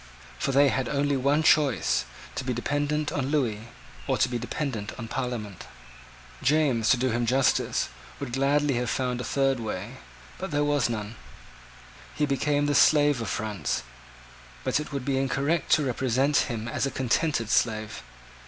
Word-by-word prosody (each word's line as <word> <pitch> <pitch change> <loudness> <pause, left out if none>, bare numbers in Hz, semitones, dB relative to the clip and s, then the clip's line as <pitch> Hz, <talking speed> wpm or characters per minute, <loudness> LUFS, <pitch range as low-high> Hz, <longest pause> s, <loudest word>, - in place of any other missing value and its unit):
For - - 0
they 140 +1 +5
had 130 -1 -1
only 145 0 +1
one 140 +4 +2
choice, 150 -5 +3 0.3
to - - -4
be 125 -1 -2
dependent 145 +4 -1
on 135 -2 -1
Lewis, 125 -8 0 0.5
or - - +1
to - - +3
be 120 -1 -3
dependent 120 -3 -4
on 115 - -6
Parliament. 115 -6 -4 0.7
James, 135 -5 +2
to 130 - +5
do 130 +1 0
him 120 0 0
justice, 135 - +2 0.3
would 135 -4 -5
gladly 140 +2 +2
have 125 0 -1
found 125 -2 -1
out - - -2
a - - -5
third 135 -2 +1
way: 110 +2 -5 0.4
but 190 - -4
there 145 -2 +1
was 145 -4 +1
none. 110 -1 -4 1.0
He 150 - +1
became 145 +1 +1
the 145 - +1
slave 145 -2 +4
of 115 - -3
France: 105 - -2 0.8
but - - +1
it 150 - -6
would 140 -3 -4
be 135 -1 +1
incorrect 140 +4 0
to 150 - +3
represent 130 +3 +1
him 115 -2 -4
as 130 - -1
a - - -1
contented 130 -2 0
slave. 110 -2 0
135 Hz, 170 wpm, -26 LUFS, 120-145 Hz, 1.0 s, they